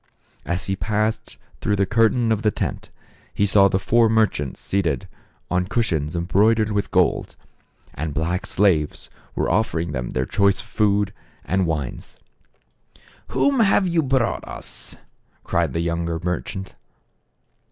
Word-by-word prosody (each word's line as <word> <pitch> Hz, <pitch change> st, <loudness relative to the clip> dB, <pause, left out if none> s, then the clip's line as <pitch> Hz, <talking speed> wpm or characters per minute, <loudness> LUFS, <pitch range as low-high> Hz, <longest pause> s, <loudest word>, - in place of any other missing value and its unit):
As 90 Hz, +1 st, -2 dB
he 95 Hz, -, -1 dB
passed 110 Hz, +2 st, -2 dB, 0.2 s
through 105 Hz, -, 0 dB
the 100 Hz, 0 st, +2 dB
curtain 115 Hz, +2 st, +2 dB
of 110 Hz, -1 st, +1 dB
the 110 Hz, -, +3 dB
tent, -, -, -4 dB, 0.5 s
he 100 Hz, -, +2 dB
saw 100 Hz, 0 st, +5 dB
the 95 Hz, -, +1 dB
four 115 Hz, +4 st, +3 dB
merchants 110 Hz, -11 st, +1 dB
seated 85 Hz, -10 st, -1 dB, 0.4 s
on 90 Hz, 0 st, +1 dB
cushions 85 Hz, -10 st, -1 dB
embroidered 105 Hz, +5 st, +2 dB
with 100 Hz, -1 st, -1 dB
gold, -, -, +1 dB, 0.6 s
and 75 Hz, +3 st, -4 dB
black 80 Hz, +5 st, -2 dB
slaves 90 Hz, -7 st, +1 dB, 0.2 s
were -, -, 0 dB
offering 85 Hz, -7 st, 0 dB
them 65 Hz, -3 st, -3 dB, 0.2 s
choice 100 Hz, -1 st, +2 dB
food 105 Hz, -2 st, +1 dB, 0.3 s
and 95 Hz, -1 st, +1 dB
wines. 75 Hz, -6 st, -4 dB, 0.5 s
" -, -, -30 dB
Whom 280 Hz, -2 st, +1 dB
have 200 Hz, -3 st, +4 dB
you 170 Hz, -2 st, +2 dB
brought 130 Hz, -4 st, 0 dB
us? -, -, -8 dB, 0.2 s
" -, -, -41 dB
cried -, -, 0 dB
the 85 Hz, -, 0 dB
younger 85 Hz, 0 st, -1 dB
merchant. 90 Hz, +2 st, -4 dB
100 Hz, 140 wpm, -22 LUFS, 85-110 Hz, 0.6 s, saw